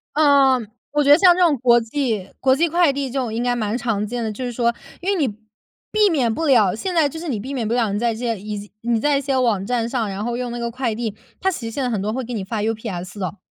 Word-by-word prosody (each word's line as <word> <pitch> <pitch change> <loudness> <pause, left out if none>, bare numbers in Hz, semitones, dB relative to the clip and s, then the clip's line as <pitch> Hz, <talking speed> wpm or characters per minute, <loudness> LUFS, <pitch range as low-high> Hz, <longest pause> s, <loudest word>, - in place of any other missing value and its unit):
呃， 280 -4 +5 0.3
我 295 0 +2
觉 285 - +4
得 290 - +9
像 355 -1 +6
这 365 - 0
种 335 -5 +5
国 240 -1 +5
际 225 -4 -2
国 260 0 +4
际 335 +5 +2
快 340 -1 +3
递 275 -1 -3
这 270 +2 -2
种 240 -4 -2
应 230 +2 -1
该 245 0 +1
蛮 220 -1 -1
常 225 -4 -1
见 240 +2 -3
的。 220 - -2
就 235 +5 -6
是 245 - -3
说 235 0 +1 0.3
因 365 - -2
为 - - +1
你， 270 - 0 0.6
避 425 -1 +4
免 260 -9 +1
不 325 - -2
了， 225 -10 +4
现 365 - -3
在 320 -4 +3
就 320 - -7
是 340 - -6
你 245 -8 -2
避 260 +7 -6
免 240 -5 -2
不 225 - -1
了 235 -4 +1
你 - - 0
在 235 0 +1
这 220 - -8
些 230 -4 -2
已 210 +1 -5
经 205 0 -11
你 235 -1 +1
在 290 +4 +2
一 - - -1
些 275 -1 -1
网 225 -7 +1
站 235 0 0
上， 235 -3 -1
然 195 +1 -4
后 240 +1 -2
用 250 -1 -3
那 240 - -5
个 235 0 -2
快 240 -1 -2
递， 220 -2 -4 0.2
它 380 - +1
其 255 -10 -6
实 225 - -4
现 270 +4 -3
在 250 - 0
很 215 -5 -1
多 210 +2 -2
会 260 +2 -2
给 245 +1 -6
你 210 -4 -3
发 215 +2 -3
UPS 210 -4 -4
的。 185 +1 -4
240 Hz, 335 characters per minute, -21 LUFS, 220-275 Hz, 0.6 s, 得